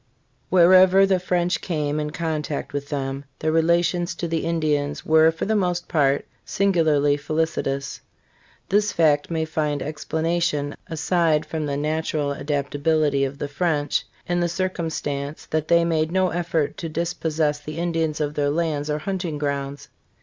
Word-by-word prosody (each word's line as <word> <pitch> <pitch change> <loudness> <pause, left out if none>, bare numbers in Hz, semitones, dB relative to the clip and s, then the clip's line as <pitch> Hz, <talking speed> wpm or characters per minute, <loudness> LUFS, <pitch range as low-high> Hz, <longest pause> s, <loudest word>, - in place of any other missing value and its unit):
HEREVER 185 +2 +7
the 190 -1 +2
French 180 -1 0
came 150 -4 -1
in 150 0 -2
contact 155 -3 -3
with 145 0 -4
them, 135 -1 -3
their 155 - 0
rela 170 +2 +3
tions 175 0 -2
to 170 - -3
the 165 -1 -1
Indians 150 -3 -1
were 160 0 +6
for 160 - -4
the 220 - +1
most 180 -3 0
part 140 -4 +2 0.2
singularly 155 -7 +2
felicitous. 140 -2 -2 0.7
This 205 +1 +2
fact 150 -5 +2
may 160 -1 -1
find 150 -2 -1
explanation, 155 -1 -1
aside 160 -1 +1
from 155 -1 -3
the 140 -1 -2
natural 155 -1 -1
adapta 145 0 -3
bility 145 -3 +2
of 135 +1 -9
the 145 - -3
French, 145 -1 0 0.2
in 175 0 0
the 175 0 +1
circumstance 160 -5 -3
that 155 0 0
they 170 0 +4
made 160 -1 0
no 185 0 +2
effort 170 -3 -1
to 165 - -4
dispossess 160 -2 -1
the 155 +1 -8
Indians 165 -2 -1
of 150 -1 -1
their 145 -1 0
lands 155 -1 -1
or 150 - 0
hunting 175 -1 -3
grounds. 140 -1 -3
155 Hz, 155 wpm, -23 LUFS, 145-170 Hz, 0.7 s, HEREVER